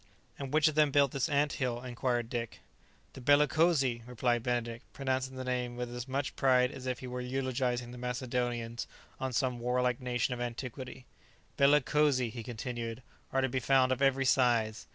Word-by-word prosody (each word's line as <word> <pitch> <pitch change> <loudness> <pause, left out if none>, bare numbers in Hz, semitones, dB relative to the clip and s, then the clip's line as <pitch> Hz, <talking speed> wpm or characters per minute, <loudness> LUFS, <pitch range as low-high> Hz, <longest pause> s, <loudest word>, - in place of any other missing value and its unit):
"And 135 -2 -5
which 155 +1 +4
of 155 - +1
them 150 -1 +4
built 140 -1 +3
this 135 +4 -1
ant 145 0 +2
hill?" 120 -2 0
inquired 120 -1 -1
Dick. 115 -1 -5 0.5
"The 130 - -10
bellicosi!" 145 -2 +3
replied 120 -1 0
Benedict, 120 0 -2
pronouncing 130 -1 -2
the 130 - -5
name 125 -1 -2
with 120 0 -4
as 120 +1 -5
much 135 +1 -2
pride 125 -1 +3
as 130 -2 -8
if 125 -1 -2
he - - -6
were 125 0 -4
eulogizing 125 -1 -1
the 125 - -9
Macedonians 120 -2 -2 0.3
or 130 0 -2
some 125 -1 0
warlike 125 +1 0
nation 125 0 0
of 120 - -5
antiquity. 125 +1 -6 0.5
"Bellicosi," 140 -3 +3
he 120 0 -6
continued, 120 0 -5 0.3
"are 135 - +2
to 130 - +2
be 130 +1 -1
found 130 +1 +3
of 130 - 0
every 135 -1 +3
size. 115 - +2
125 Hz, 175 wpm, -31 LUFS, 120-135 Hz, 0.5 s, which